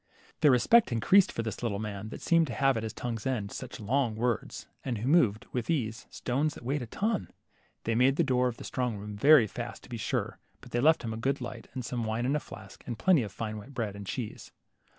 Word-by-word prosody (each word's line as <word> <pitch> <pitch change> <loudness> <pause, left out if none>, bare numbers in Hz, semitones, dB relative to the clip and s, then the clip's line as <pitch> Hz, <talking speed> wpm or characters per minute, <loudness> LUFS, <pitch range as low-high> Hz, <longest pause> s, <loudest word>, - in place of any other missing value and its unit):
LITTLE - - -37
HANS. - - -27
39 - - -31
Their 150 -3 +7
respect 225 - +5
had 120 - -1
increased 190 - +5
for 115 - -3
this 110 - -5
little 115 -5 -1
man 105 0 -5
that - - -8
seemed 165 -2 +4
to 120 - -5
have 135 -1 +3
at 115 - -1
his 110 0 -4
tongue's 120 0 -4
end 110 -7 -2
such 130 0 -7
long 120 +1 0
words, 120 0 -2 0.2
and 125 -3 -2
who 110 +4 -3
moved, 120 -9 +3
with 125 -3 -3
ease, 115 -8 -1
stones 140 +4 -1
that - - -11
weighed 140 +3 0
a 120 - -5
ton! 210 - -1 0.5
They 115 - 0
made 130 +4 +4
the 170 - +3
door 125 -3 +2
of 120 -2 -4
the - - -9
strong 125 -4 -2
room 105 +1 -7
very 140 +3 +7
fast, 105 - -6
to - - -15
be - - -4
sure, - - -2 0.2
but - - -14
they 120 - 0
left 155 +3 +4
him 115 -1 -3
a - - -5
good 135 +5 0
light, 120 -2 -7
and 130 -2 -4
some 120 0 -2
wine 110 +2 -1
in 135 +3 +1
a - - +2
flask, - - -12
and 120 -3 -4
plenty 180 - +4
of 105 -4 -4
fine 110 +1 -4
white 130 +6 -13
bread 110 -5 -2
and 100 -1 -8
cheese. 115 -2 -5
120 Hz, 265 wpm, -29 LUFS, 110-135 Hz, 0.5 s, Their